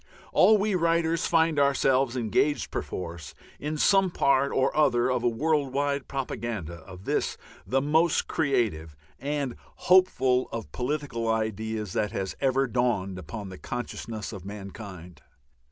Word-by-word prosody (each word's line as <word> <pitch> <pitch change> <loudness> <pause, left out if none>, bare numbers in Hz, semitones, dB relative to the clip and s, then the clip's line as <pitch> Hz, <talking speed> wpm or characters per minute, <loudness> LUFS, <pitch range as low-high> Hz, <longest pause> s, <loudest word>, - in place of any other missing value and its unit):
All 220 - +6
we 210 +1 0
writers 165 -1 +1
find 160 -2 +3
ourselves 135 -2 +2
engaged 125 +5 +1
perforce 85 -4 -5 0.2
in 150 +1 -3
some 195 +4 +4
part 140 -4 +2
or 135 +1 +1
other 125 -4 +3
of 125 -1 0
a 120 - +3
world 145 +2 0
wide 140 0 -1
propaganda 115 - -4
of 90 0 -11
this - - -1 0.3
the 135 +6 +1
most 160 +3 +2
creative 110 - 0 0.2
and 140 -3 -2 0.2
hopeful 155 -9 +3
of 115 -1 -6
political 130 -3 -2
ideas 110 -2 -2
that 105 0 -1
has 95 -3 -3
ever 135 0 +2
dawned 115 -7 0
upon 95 +4 -7
the 95 - -10
consciousness 115 -2 -5
of 95 -4 -8
mankind. 95 -4 -9
125 Hz, 135 wpm, -27 LUFS, 105-145 Hz, 0.3 s, All